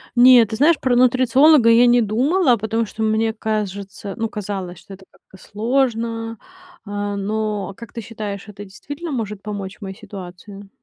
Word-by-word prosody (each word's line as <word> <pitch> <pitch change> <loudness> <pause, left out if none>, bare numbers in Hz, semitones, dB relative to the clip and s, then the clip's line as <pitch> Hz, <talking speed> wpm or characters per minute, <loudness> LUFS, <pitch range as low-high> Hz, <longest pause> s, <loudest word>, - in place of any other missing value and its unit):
Нет, 245 -2 +7
ты 220 - -3
знаешь, 295 +4 +3
про 255 -2 +1
нутрициолога 255 +2 +5
я 230 +1 +6
не 240 0 +4
думала, 255 - +2
потому 225 +2 -1
что 220 +1 -5
мне 220 +1 +1
кажется, 200 -2 -4
ну, 225 -1 -2
казалось, 195 -4 -6
что 195 - -13
это 190 0 -14
как-то 190 - -20
сложно, 230 0 -2 0.5
а, 205 0 -3
но, 205 -1 -3
как 235 -2 -11
ты 235 - -5
считаешь, 210 -3 -7
это 205 0 -10
действительно 290 - -8
может 210 -5 -4
помочь 205 -1 -7
моей 190 -1 -7
ситуации? 195 -1 -11
220 Hz, 160 wpm, -20 LUFS, 200-240 Hz, 0.5 s, Нет